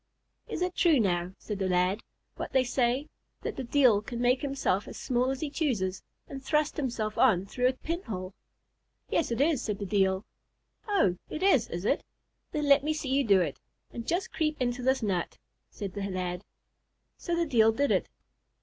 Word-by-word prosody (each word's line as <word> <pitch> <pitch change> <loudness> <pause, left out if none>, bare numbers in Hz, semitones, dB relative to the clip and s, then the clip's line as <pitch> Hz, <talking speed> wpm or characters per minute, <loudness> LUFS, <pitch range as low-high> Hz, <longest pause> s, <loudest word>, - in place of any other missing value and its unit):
"Is - - -2
it 360 0 -1
true, 325 -6 +4
now," 180 -3 0
said 210 -2 -5
the 190 -1 0
lad, 180 +4 +2 0.3
"what - - -6
they 260 - +4
say, 250 +3 0 0.4
that - - -3
the 265 - -4
Deil 245 -5 +4
can 235 +2 -6
make 245 +1 +3
himself 270 -9 0
as - - -8
small 250 0 0
as 270 0 -3
he 310 - -2
chooses, 210 - -1 0.3
and 270 -1 -8
thrust 300 +1 +1
himself 235 -7 -2
on 195 -8 +4
through 250 +5 +1
a 255 - +2
pinhole?" 230 - -5 0.8
"Yes, 330 - +1
it 235 0 -2
is," 290 -2 +3
said 210 -4 -2
the 200 - -4
Deil. 190 0 +1 0.6
"Oh! 290 - +2
it 310 - -4
is, 280 - +4
is 175 +3 -4
it? - - +1 0.5
then 300 -1 -1
let 280 0 +6
me 310 +1 0
see 295 -3 -4
you 280 +1 +3
do 200 -6 +5
it, 155 -6 -2 0.3
and 230 -1 -6
just 355 +3 -1
creep 305 -1 -1
into 245 0 -1
this 260 0 +1
nut," 185 -5 -1 0.3
said 195 -3 -6
the 200 -1 -3
lad. 180 0 -3 0.7
So 345 - -1
the 340 0 +1
Deil 225 -7 +4
did 280 +5 +1
it. - - +1
245 Hz, 195 wpm, -29 LUFS, 195-285 Hz, 0.8 s, let